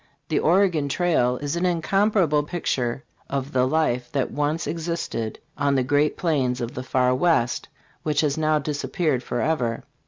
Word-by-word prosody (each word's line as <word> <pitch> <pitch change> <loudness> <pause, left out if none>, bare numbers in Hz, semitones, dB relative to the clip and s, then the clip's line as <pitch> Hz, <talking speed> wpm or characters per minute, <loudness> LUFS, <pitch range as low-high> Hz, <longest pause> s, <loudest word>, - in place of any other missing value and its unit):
"The - - +2
Oregon 170 -4 +3
Trail" 135 -7 +2
is 145 +2 -1
an 170 - -1
incomparable 180 -2 +2
picture 135 -6 -2 0.3
of 135 0 -3
the 130 -2 +2
life 130 -5 0
that 135 -2 0
once 150 +3 -1
ex 165 0 -4
isted 140 -10 -3 0.2
on 140 -1 +2
the 130 - +2
great 145 +3 +1
plains 135 -8 0
of 120 -1 -4
the 125 - -4
Far 125 0 +2
West, 130 -4 +1 0.3
which 150 -2 +1
has 145 -3 +1
now 155 -1 +2
disappeared 150 -1 -1
forever. 120 -2 -1
145 Hz, 160 wpm, -24 LUFS, 125-165 Hz, 0.3 s, Oregon